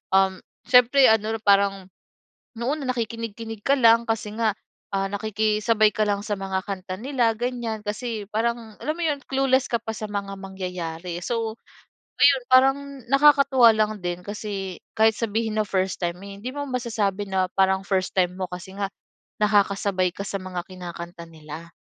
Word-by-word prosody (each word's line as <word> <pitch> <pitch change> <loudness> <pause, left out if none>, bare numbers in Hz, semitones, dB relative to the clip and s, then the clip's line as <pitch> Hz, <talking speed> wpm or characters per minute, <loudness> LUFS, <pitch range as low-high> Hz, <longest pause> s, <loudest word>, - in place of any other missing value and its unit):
um, 190 -1 +3 0.3
siyempre 250 +2 +6
ano 220 0 +1
parang 195 -1 +3 0.7
noon 275 +6 -1
na 255 - 0
nakikinig-kinig 225 -1 -5
ka 280 - +4
lang 230 -1 +5
kasi 210 -1 -2
nga, 220 -3 +2 0.4
ah, 195 0 +1
nakikisabay 215 +1 +2
ka 215 - +1
lang 200 0 0
sa 210 -1 -2
mga 190 -1 -2
kanta 185 -1 -4
nila 250 -4 +1
ganyan 240 -3 -3
kasi 215 -1 -4
parang 225 0 -2
alam 305 - -1
mo 345 - -5
'yon, 295 -2 0
clueless 265 -1 +2
ka 235 - +3
pa 225 - -8
sa 215 - -5
mga 200 -1 -3
mangyayari. 180 -3 -5
So, 230 -1 -2 0.6
ayun 275 -3 +5
parang 265 +2 +6 0.3
nakakatuwa 275 -4 +6
lang 215 -1 +1
din 175 0 -3
kasi 200 -3 -5 0.2
kahit 220 0 +5
sabihin 220 -1 -1
na - - +2
first 190 -1 -1
time, 170 0 -1
hindi 200 +4 -7
mo 285 0 -3
masasabi 215 -5 -1
na 190 -1 +1
parang 190 0 +2
first 190 -2 0
time 180 -1 +3
mo, 185 -1 -3
kasi 180 +1 -8
nga 200 -1 -1 0.5
nakakasabay 200 -3 +2
ka 200 - -4
sa 195 - -3
mga 180 -2 -5
kinakanta 175 -1 -8
nila. 160 +1 -10
210 Hz, 160 wpm, -24 LUFS, 190-235 Hz, 0.7 s, siyempre